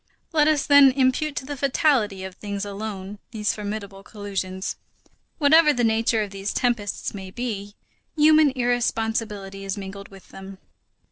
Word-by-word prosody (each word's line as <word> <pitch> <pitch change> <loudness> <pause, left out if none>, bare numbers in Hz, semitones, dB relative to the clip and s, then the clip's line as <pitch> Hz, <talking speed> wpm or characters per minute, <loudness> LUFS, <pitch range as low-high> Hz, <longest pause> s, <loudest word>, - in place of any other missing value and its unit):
Let 300 -2 +4
us, 305 -3 +2
then, 285 -2 +7
impute 275 +3 +1
to 265 - -4
the 290 +1 -5
fatality 255 - +1
of 190 -1 -7
things 200 +1 -5
alone 200 -1 -6
these 215 -3 -1
formidable 205 -2 -6
collisions. 195 -2 -5 0.6
Whatever 300 0 +5
the 245 - 0
nature 225 -1 +2
of 205 - -7
these 195 +1 -4
tempests 235 -5 -1
may 190 -2 -7
be, 205 -2 -5 0.4
human 310 0 +6
irresponsibility 225 -5 -1
is 195 +1 -4
mingled 200 0 -8
with 195 -2 -16
them. 195 0 -10
215 Hz, 145 wpm, -24 LUFS, 195-260 Hz, 0.6 s, then